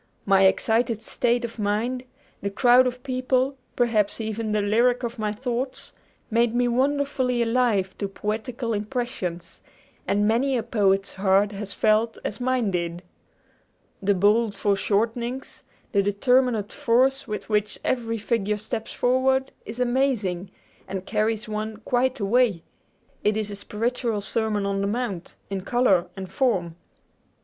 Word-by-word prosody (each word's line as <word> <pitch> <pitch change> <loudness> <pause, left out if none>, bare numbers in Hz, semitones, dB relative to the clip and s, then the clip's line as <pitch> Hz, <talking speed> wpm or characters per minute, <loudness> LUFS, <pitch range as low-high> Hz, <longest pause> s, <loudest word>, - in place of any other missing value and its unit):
My 195 -1 +5
excited 225 +3 +2
state 240 +1 0
of 230 0 -9
mind, 225 +5 -1 0.4
the 200 - -1
crowd 245 +5 +5
of 250 0 -5
people, 255 0 0 0.2
perhaps 225 -4 +1
even 220 0 -3
the 210 - +2
lyric 240 +4 +2
of 235 0 -4
my 210 -1 0
thoughts, 250 +3 -4 0.4
made 230 +1 +2
me 245 0 +3
wonderfully 260 -1 +1
alive 230 -5 +1
to 200 - -1
poetical 225 +4 -3
impressions; 205 -6 -4 0.5
and 205 +1 +2
many 255 +4 +2
a 230 - -1
poet's 195 -4 +1
heart 195 +1 +2
has 200 0 -6
felt 220 +1 +2
as 205 - -4
mine 250 -4 +1
did! 170 0 -3 1.0
The 200 0 +2
bold 210 +3 +3
foreshortenings, 225 +6 -1 0.3
the 200 - +3
determinate 225 +2 +2
force 270 0 +2
with 210 -1 -5
which 210 -1 0
every 230 -3 0
figure 210 -1 0
steps 220 +2 -5
forward, 265 +1 +2 0.2
is 225 +3 -7
amazing, 240 -8 0 0.4
and 190 0 -5
carries 215 +1 0
one 215 0 -4
quite 245 +3 0
away! 210 -3 +2 0.6
It 210 +1 +2
is 210 -1 -2
a - - -5
spiritual 230 +1 -2
Sermon 210 0 -1
on 195 0 -1
the 200 - 0
Mount, 205 -5 -3 0.2
in 195 -1 -2
color 195 -5 +2
and 190 -1 -6
form. 190 - 0
225 Hz, 140 wpm, -25 LUFS, 205-245 Hz, 1.0 s, My